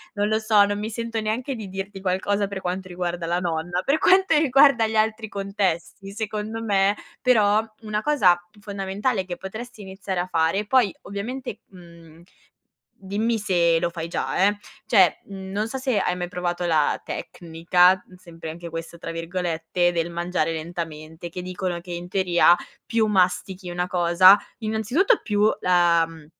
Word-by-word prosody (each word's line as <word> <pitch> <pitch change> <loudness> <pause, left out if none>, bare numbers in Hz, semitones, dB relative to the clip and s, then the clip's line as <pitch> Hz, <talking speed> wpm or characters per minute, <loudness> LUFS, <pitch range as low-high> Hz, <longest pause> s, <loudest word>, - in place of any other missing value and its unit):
non 205 0 +1
lo 215 +1 +1
so, 215 -2 +4
non 205 0 -2
mi 215 +1 -3
sento 230 0 -3
neanche 235 +5 -2
di 215 -4 -7
dirti 195 +1 -6
qualcosa 200 +2 0
per 195 -1 -5
quanto 185 +1 -4
riguarda 175 -1 -3
la 175 +1 0
nonna. 175 +1 -2
Per 285 +3 +2
quanto 380 +1 +4
riguarda 275 -4 +5
gli 220 - -4
altri 220 0 0
contesti, 195 -1 -3
secondo 215 +1 -4
me, 200 -2 +2 0.3
però, 215 -4 +4 0.2
una 215 -1 -2
cosa 215 -11 +4 0.2
fondamentale 200 +1 -2
che 180 -1 -6
potresti 220 +3 -8
iniziare 190 -1 -5
a 175 - -2
fare, 165 +4 +1
poi 235 -3 +3
ovviamente, 215 +3 -6
mhmm, 170 -3 -16 0.8
dimmi 210 +4 -1
se 175 -5 +2
lo 170 - 0
fai 165 -1 -6
già, 185 +2 0
eh! 205 0 +1 0.3
Cioè 195 -6 +4
non 195 +2 -4
so 265 - -5
se 260 -4 0
hai 180 -2 0
mai 175 -1 -4
provato 175 0 -3
la 160 -4 +2
tecnica, 180 +2 +1
sempre 170 -3 -11
anche 170 +1 -8
questo, 165 +1 -7
tra 165 - -6
virgolette, 170 0 -1
del 170 0 -1
mangiare 170 -1 -1
lentamente, 160 0 -6
che 180 +2 -6
dicono 180 -1 -4
che 175 0 -8
in 175 +1 -6
teoria 180 -2 +4 0.3
più 230 -1 +1
mastichi 185 -1 0
una 175 0 -2
cosa 180 +2 +6 0.2
innanzitutto 235 - +1
più 210 -1 +2
la, 175 -2 +3
mhmm, 160 -2 -13
190 Hz, 160 wpm, -23 LUFS, 175-215 Hz, 0.8 s, cosa